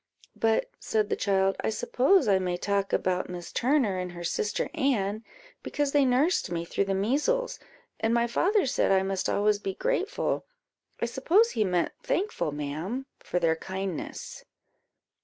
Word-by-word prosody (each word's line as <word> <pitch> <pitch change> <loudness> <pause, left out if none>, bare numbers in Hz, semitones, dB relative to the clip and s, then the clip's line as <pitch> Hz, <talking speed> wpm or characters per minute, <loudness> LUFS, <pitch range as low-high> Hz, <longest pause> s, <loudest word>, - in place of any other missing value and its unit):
"But," 225 - +1
said 215 -1 0
the - - +1
child, 195 -1 +1
"I - - 0
suppose 260 - +3
I 195 -2 +4
may 180 -1 -1
talk 200 +1 -1
about 185 0 0
Miss 175 -1 -7
Turner 245 -7 +2
and 180 -1 -4
her 175 0 -7
sister 205 +4 -1
Anne, 215 -5 0 0.4
because 290 -1 -1
they 285 -1 +4
nursed 265 - +2
me 170 -1 -3
through 200 - 0
the 195 0 0
measles, 300 - 0 0.4
and 225 0 +1
my 235 0 +3
father 380 - +2
said 255 - +1
I 190 0 +4
must 195 -1 -1
always 205 0 +2
be 195 -2 -4
grateful - - -1 0.5
I - - 0
suppose 345 - +3
he 215 - +1
meant 180 -3 +1
thankful, 390 - -1
ma'am, 155 - -4
for - - -3
their 165 -2 +2
kindness." 190 0 -5
205 Hz, 160 wpm, -28 LUFS, 185-265 Hz, 0.5 s, I